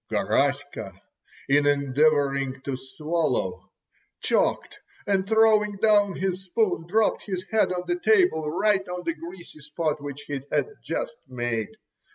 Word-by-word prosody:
Garaska, - - -1 0.5
in 145 +1 +3
endeavouring 140 -1 +2
to 135 -1 -3
swallow, 130 - -2 0.5
choked, - - 0 0.3
and 195 -1 0
throwing 220 -2 +4
down 205 -2 +3
his 190 0 -2
spoon, 180 -4 0
dropped 215 +4 +2
his 185 -2 -3
head 220 -4 +3
on 180 -1 -2
the 350 - -1
table, 360 - +3
right 195 +3 +1
on 180 0 -5
the 165 - -1
greasy 170 0 -11
spot 150 +1 -3
which 145 0 -6
he 145 -2 -4
had - - +1
just - - -4
made. 120 -3 -3
170 Hz, 135 wpm, -25 LUFS, 145-205 Hz, 0.5 s, throwing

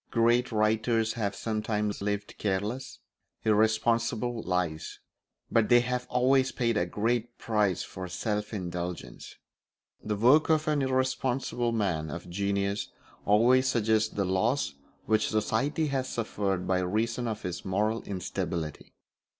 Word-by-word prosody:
Great 120 +1 +3
writers 110 +1 +1
have 100 -4 -2
sometimes 105 -2 -2
lived 105 0 -3
careless, 105 +6 -2 0.5
irresponsible 115 +2 +2
lives, 90 -5 -2 0.5
but 115 -2 +3
they 120 -1 +7
have 125 0 -2
always 130 +1 +3
paid 115 -2 0
a 90 -3 +1
great 120 +5 -1
price 105 -4 +1
for 95 0 -7
self 105 +4 -2
indulgence. 90 -3 -5 0.7
The 105 - -1
work 130 +10 +5
of 155 0 +2
an 150 -2 +2
irresponsible 130 -2 0
man 90 -9 -1
of 85 +4 -7
genius 100 +2 -1 0.4
always 120 +6 +5
suggests 110 -3 +2
the 100 - -2
loss 95 - +1 0.3
which 110 0 +2
society 110 +9 0
has 130 -1 -1
suffered 100 -5 -2
by 95 -1 +1
reason 115 +6 -1
of 110 -1 -4
his 90 -1 -4
moral 105 +4 0
instability. 90 -4 -4
110 Hz, 125 wpm, -29 LUFS, 100-120 Hz, 0.7 s, they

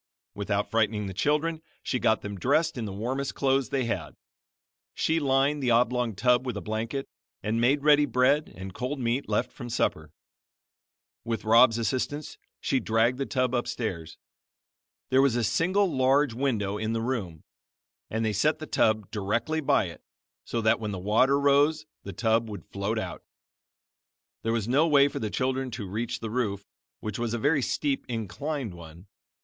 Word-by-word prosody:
Without 100 0 -2
frightening 110 -2 +1
the 95 - -5
children 150 - 0 0.2
she 125 - -1
got 110 - +2
them 100 0 -5
dressed 155 - +2
in 120 -3 -3
the 100 - -5
warmest 130 +7 -3
clothes 135 -1 +1
they 135 -3 0
had. 80 -10 -3 0.8
She 160 +1 +1
lined 140 +1 +2
the 125 - +1
oblong 120 -1 +2
tub 125 +4 +3
with 125 -5 -4
a - - -2
blanket, 110 +7 -3 0.4
and 110 +2 0
made 140 +4 +3
ready 150 -1 +5
bread 135 +4 +2
and 95 0 -8
cold 130 +6 -3
meat 120 +2 -1
left - - 0
from 120 -3 -8
supper. 80 -9 -1 1.1
With 115 -1 -3
Rob's 115 +1 +6
assistance 130 +6 -2 0.2
she 135 - 0
dragged 115 +3 +1
the 135 - -2
tub 130 -2 0
upstairs. 110 -10 -3 0.9
There 130 +1 +5
was 135 -4 +3
a 120 - +1
single 185 - +2
large 135 0 +3
window 110 -6 -1
in 110 +1 -1
the 115 - -1
room, 100 -11 -3 0.7
and 110 +1 -1
they 110 - 0
set 150 +10 +2
the 155 - -7
tub 110 -7 +1
directly 115 +9 -1
by 135 - +3
it, 85 - -9 0.4
so 115 - -2
that 110 -1 +3
when 110 -1 -3
the 100 - -4
water 115 +9 +3
rose 145 +2 +3 0.2
the 100 - -7
tub 110 +3 +1
would 100 -5 -8
float 100 +3 -3
out. 110 - -4 1.2
There 115 - -1
was 115 -2 -1
no 140 +7 +3
way 145 -2 +5
for - - -5
the 110 - -2
children 130 +5 -1
to 115 -4 -6
reach 110 +5 -3
the 110 -1 -4
roof, 105 -5 -2 0.4
which 105 0 -4
was 120 -1 -1
a - - -1
very 145 +4 +2
steep, 140 +2 -1
inclined 115 - -3
one. 85 +1 -12
120 Hz, 175 wpm, -27 LUFS, 105-135 Hz, 1.2 s, Rob's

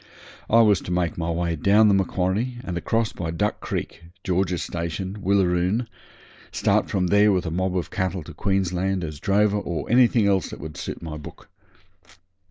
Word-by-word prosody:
I 115 +1 +6
was 105 -5 +4
to - - -6
make 90 -2 0
my 85 0 -3
way 85 0 -1
down 105 +7 +4
the 100 - +4
Macquarie 95 +5 0
and 90 - -4
across 115 +6 -1
by 85 -2 -4
Duck 105 +6 -1
Creek, 85 - -5 0.2
George's 90 -1 0
station, 90 +4 -4
Willaroon; 95 +3 +1 0.7
start - - +1
from 95 -2 0
there 100 +3 +4
with 90 -2 0
a 80 - -3
mob 95 +2 -1
of 90 - -3
cattle 95 -2 -2
to - - -11
Queensland 95 -1 -1
as 75 -3 -6
drover 105 +2 +2
or 85 -4 -4
anything 120 -3 +4
that 95 -2 0
would 75 0 -8
suit - - -6
my 80 -2 -6
book. 75 - -12
95 Hz, 175 wpm, -24 LUFS, 85-100 Hz, 0.7 s, I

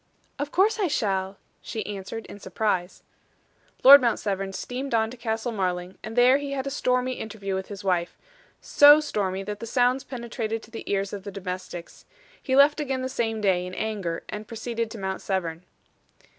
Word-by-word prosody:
"Of 290 0 -3
course 415 +5 +3
I 395 - +2
shall," 195 - -1 0.2
she 220 - -5
answered, 205 +2 -6
in 205 - -11
surprise. 195 -4 -2 0.8
Lord 280 +2 +11
Mount 235 -2 +2
Severn 195 -1 -2
steamed 250 +5 -4
on 220 0 +1
to - - -8
Castle 225 0 -2
Marling, 180 -3 -2
and 220 +1 -7
there 250 +3 +6
he 285 -1 -4
had 270 -1 -3
a 275 - -3
stormy 250 -2 0
interview 205 -3 -5
with 190 0 -3
his 200 -1 -8
wife 180 -3 0 0.4
so 290 +1 +7
stormy 195 -10 -2
that 205 +1 -5
the 230 - -6
sounds 250 +3 +2
penetrated 235 -3 -4
to 220 - -15
the 225 - -8
ears 195 0 -1
of 200 -2 -6
the 200 - -6
domestics. 185 -2 -7 0.4
He 260 - 0
left 285 +2 +6
again 265 -3 -2
the 260 - -2
same 225 -4 -2
day, 185 -3 +2
in 180 0 -7
anger, 200 -6 -3
and 210 0 -7
proceeded 230 0 -3
to 225 - -8
Mount 190 -1 -4
Severn. 175 -3 -3
220 Hz, 185 wpm, -25 LUFS, 195-250 Hz, 0.8 s, Lord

